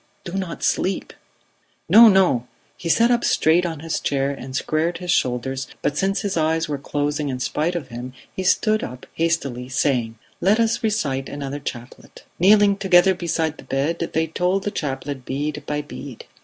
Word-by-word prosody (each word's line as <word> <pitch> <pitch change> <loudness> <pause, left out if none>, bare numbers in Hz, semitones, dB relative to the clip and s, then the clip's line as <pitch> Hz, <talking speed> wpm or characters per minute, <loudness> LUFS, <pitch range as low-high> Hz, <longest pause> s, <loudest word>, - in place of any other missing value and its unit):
Do 175 - -7
not 190 -3 -4
sleep!" 190 - 0 0.7
"No! 230 +2 +9
No!" 185 - +4 0.3
He 170 - -5
sat 230 +7 +4
up 240 -1 +2
straight 170 +3 +3
on 160 -3 -6
his 165 0 -2
chair 140 0 0
and 130 -1 -7
squared 160 +5 0
his 180 0 -3
shoulders 130 -2 0 0.2
but 145 - 0
since 195 +5 0
his 200 -1 -2
eyes 160 0 +1
were 145 -2 -3
closing 145 +1 -2
in 130 -1 -3
spite 155 +7 -1
of 145 -7 -4
him, 125 +1 -7 0.2
he - - -3
stood 215 +3 +2
up 125 0 -7
hastily, 140 -7 -1
saying: 125 -4 0 0.2
"Let 205 +5 +3
us 230 +1 +1
recite 145 -12 -1
another 140 0 -5
chaplet." 120 -3 -9 0.2
Kneeling 200 +2 +5
together 190 -1 +5
beside 165 -3 -2
the - - -10
bed, 145 +5 -1
they 160 0 +2
told 180 +4 0
the 205 - -2
chaplet 135 -3 -4
bead 145 +3 -3
by 150 0 -2
bead. 140 -4 -9
155 Hz, 175 wpm, -22 LUFS, 135-185 Hz, 0.7 s, No